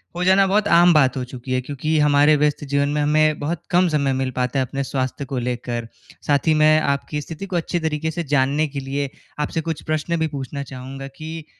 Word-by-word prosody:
हो 180 - -2
जाना 190 +1 +5
बहुत 205 +2 +2
आम 170 0 +6
बात 135 -3 +3
हो 125 - -2
चुकी 130 +1 -6
है, 130 - +2
क्योंकि 145 +4 -2
हमारे 150 +1 +5
व्यस्त 150 0 +1
जीवन 140 0 0
में 150 0 0
हमें 155 +1 +2
बहुत 160 +3 -3
कम 180 +1 +4
समय 140 -3 +1
मिल 130 0 -1
पाता 125 +2 0
है 130 - +1
अपने 135 +2 -3
स्वास्थ्य 130 +1 -3
को 130 0 -4
लेकर। 120 -1 -3 0.4
साथ 145 +2 +2
ही 160 - +5
मैं 155 0 +6
आपकी 140 +1 -1
स्थिति 165 +6 -7
को 185 -2 -5
अच्छी 175 +1 -1
तरीके 160 0 -2
से 170 +2 -3
जानने 145 +3 +2
के 140 0 -5
लिए 135 +1 -3 0.3
आपसे 155 +2 -1
कुछ 160 - -3
प्रश्न 155 +2 -1
भी 160 - +1
पूछना 140 0 -5
चाहूँगा, 135 +1 -8
कि 155 +3 -8
145 Hz, 225 wpm, -21 LUFS, 135-160 Hz, 0.4 s, आम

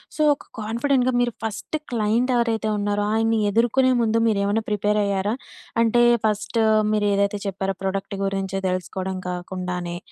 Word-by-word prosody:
So - - -2
ఒక 285 - -12
కాన్ఫిడెంట్‌గా 245 +4 +1
మీరు 245 0 +1
ఫస్ట్ 220 +7 -4 0.2
క్లైంట్ 230 +2 +1
ఎవరైతే 225 -2 +1
ఉన్నారో 205 0 0
ఆయన్ని 225 0 +2
ఎదుర్కొనే 240 +5 +3
ముందు 225 -1 +2
మీరేమన్నా 205 +1 +1
ప్రిపేర్ 210 0 +1
అయ్యారా? 200 +1 0 0.5
అంటే 230 +1 +3 0.2
ఫస్ట్ 210 +1 0 0.3
మీరేదైతే 205 -1 +1
చెప్పారో 195 0 -2
ప్రోడక్ట్ 195 +1 -3
గురించి 195 -1 -2
తెలుసుకోవడం 185 +1 -3
కాకుండానే 180 -1 -4
210 Hz, 130 wpm, -23 LUFS, 195-225 Hz, 0.5 s, ఎదుర్కొనే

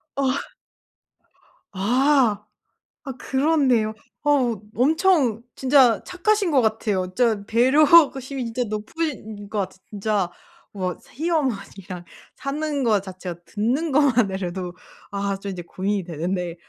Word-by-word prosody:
어. 275 - 0 1.5
아. 235 +1 +2 0.6
아 270 - -4
그렇네요. 265 -6 +2 0.3
어우 255 -8 +2
엄청 285 - +3
진짜 260 -4 +4
착하신 390 0 +1
것 275 - +5
같아요. 215 -4 0
진짜 225 -4 +2
배려심이 270 +1 +4
진짜 235 +2 -2
높으신 215 -2 -4
것 210 - -4
같아 195 -2 -3
진짜 205 -3 -1 0.4
와 185 -3 -3
시어머니랑 210 - -3 0.3
사는 290 -1 -2
거 215 -3 +3
자체가 185 -2 -8
듣는 250 - -1
것만으로도 195 -10 +1 0.4
아 200 -1 -2
좀 200 +1 -6
이제 180 -2 -6
고민이 195 +3 -2
되는데 175 +1 -3
225 Hz, 235 characters per minute, -23 LUFS, 195-275 Hz, 1.5 s, 것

